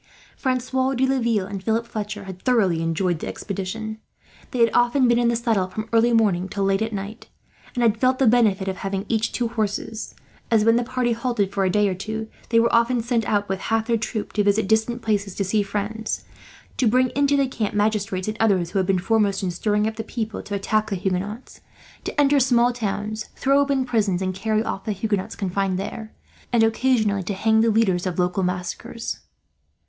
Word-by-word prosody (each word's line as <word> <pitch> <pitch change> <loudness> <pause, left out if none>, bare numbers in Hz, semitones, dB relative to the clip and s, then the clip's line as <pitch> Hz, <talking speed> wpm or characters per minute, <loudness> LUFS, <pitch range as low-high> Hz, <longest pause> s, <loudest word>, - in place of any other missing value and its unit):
Francois 260 0 0
de 260 +2 +2
Laville 235 -7 +1
and 195 -1 -6
Philip 225 +2 0
Fletcher 210 -2 -5
had 190 -1 -9
thoroughly 195 -10 +2
enjoyed 165 +1 0
the - - -5
expedition. 215 +3 -5 0.5
They 255 - -5
had 230 -2 +4
often 245 +2 +3
been 240 0 +3
in 240 - +2
the 235 - +2
saddle 225 -5 +1
from 215 +4 -5
early 230 +1 +4
morning 195 -5 +2
to 200 +1 -2
late 195 +1 +1
at 220 0 -1
night; 205 +2 -6 0.5
and 245 - +1
had 225 -1 +2
felt 255 +1 +3
the 270 - +3
benefit 215 -5 +3
of 190 -1 -2
having 195 0 -3
each 225 -1 0
two 240 -2 -1
horses 220 0 -3 0.3
as, 220 -2 +3
when 230 0 +5
the 240 - +2
party 250 0 -1
halted 230 -4 -1
for 195 -1 +1
a - - +2
day 210 +2 +3
or 190 - 0
two, 220 +4 -5 0.2
they 230 - +4
were 235 0 +2
often 235 0 +3
sent 235 -2 0
out 205 -1 +1
with 190 0 -2
half 225 +1 0
their 235 - +1
troop 215 -1 -3
to 210 - +2
visit 205 0 +2
distant 220 +3 +1
places 205 -3 -1
to 200 - -1
see 205 +3 +1
friends; 210 +2 -3 0.5
to 255 - +2
bring 255 +3 +3
into 285 +1 +2
the 275 - +3
camp 225 -6 -3
magistrates, 205 -3 0
and 215 0 -3
others, 190 -6 +2
who 200 - 0
had 185 - 0
been 195 -1 +3
foremost 200 +1 +1
in 180 - 0
stirring 210 +4 0
up 220 0 -3
the 225 - -3
people 220 -1 -4
to 205 - -5
attack 215 +2 0
the 200 - -1
Huguenots; 195 +5 -4 0.4
to - - -3
enter 285 0 +4
small 245 -1 +3
towns, 215 -1 -3
throw 275 +1 +3
open 280 -2 +1
prisons 210 -7 +1
and 185 0 -1
carry 215 +3 0
off 195 - -4
the 215 - -2
Huguenots 200 -1 -2
confined 195 -1 -1
there; 215 +3 -6 0.4
and 235 -2 +4
occasionally 225 -3 +2
to 190 +2 -4
hang 220 +3 +3
the 230 - +3
leaders 200 -5 +2
of 180 - -3
local 180 +2 +1
massacres. 180 +5 -4
215 Hz, 210 wpm, -23 LUFS, 195-235 Hz, 0.5 s, when